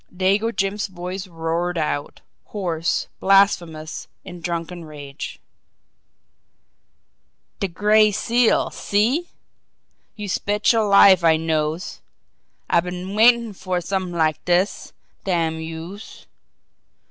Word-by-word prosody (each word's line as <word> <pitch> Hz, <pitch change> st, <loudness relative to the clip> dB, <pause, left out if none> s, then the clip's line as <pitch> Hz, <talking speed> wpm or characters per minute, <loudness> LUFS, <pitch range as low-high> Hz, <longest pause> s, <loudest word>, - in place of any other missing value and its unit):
Dago 195 Hz, +5 st, +1 dB
Jim's 200 Hz, -1 st, -1 dB
voice 185 Hz, +1 st, -6 dB
roared 170 Hz, +1 st, -2 dB
out, 150 Hz, -2 st, -3 dB, 0.2 s
hoarse, 170 Hz, -5 st, -2 dB
blasphemous, 175 Hz, -5 st, +2 dB, 0.2 s
in 180 Hz, -2 st, -10 dB
drunken 170 Hz, 0 st, -4 dB
rage: 145 Hz, -2 st, -8 dB, 2.2 s
"De 195 Hz, -, 0 dB
Gray 210 Hz, +4 st, +3 dB
Seal 235 Hz, +3 st, +2 dB
see! 240 Hz, +12 st, 0 dB, 0.9 s
Youse 205 Hz, -3 st, -3 dB
betcher 210 Hz, +2 st, +2 dB
life 200 Hz, -3 st, +6 dB
I 160 Hz, -1 st, +5 dB
knows! 160 Hz, +2 st, -2 dB, 0.7 s
I -, -, +3 dB
been 180 Hz, +2 st, -5 dB
waitin' 230 Hz, 0 st, +4 dB
fer 185 Hz, -1 st, -3 dB
somet'ing 180 Hz, -1 st, -3 dB
like 155 Hz, -2 st, +1 dB
dis, 180 Hz, +3 st, 0 dB, 0.3 s
damn 165 Hz, -4 st, 0 dB
youse! 165 Hz, +6 st, -9 dB
180 Hz, 100 wpm, -22 LUFS, 165-205 Hz, 2.2 s, life